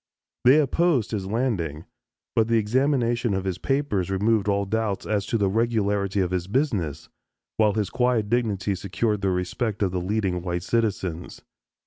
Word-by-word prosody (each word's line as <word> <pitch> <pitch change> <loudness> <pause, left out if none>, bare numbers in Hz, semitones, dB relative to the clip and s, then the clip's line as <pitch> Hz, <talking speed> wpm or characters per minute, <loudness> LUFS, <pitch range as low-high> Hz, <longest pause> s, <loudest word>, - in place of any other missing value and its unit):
They 135 +5 +7
opposed 150 - +1
his 100 -4 -3
landing, 95 - -2 0.5
but 110 -1 +3
the 115 0 +3
examination 120 -1 +1
of 95 - -2
his 95 -1 -2
papers 135 -10 0
removed 105 +2 +1
all 100 0 +1
doubts 110 0 -2
as 105 -2 -1
to 115 - 0
the 100 -2 +2
regularity 105 -2 +1
of 90 -1 -1
his 90 -1 -2
business, 95 - -1 0.5
while 105 -2 +3
his 105 -3 -1
quiet 125 -4 +1
dignity 105 -4 0
secured 100 +3 -1
the 100 - +1
respect 95 +4 -1
of 95 - +1
the 90 -1 -2
leading 95 -2 -1
white 85 -1 -3
citizens. 95 -7 -2
105 Hz, 160 wpm, -25 LUFS, 95-115 Hz, 0.5 s, They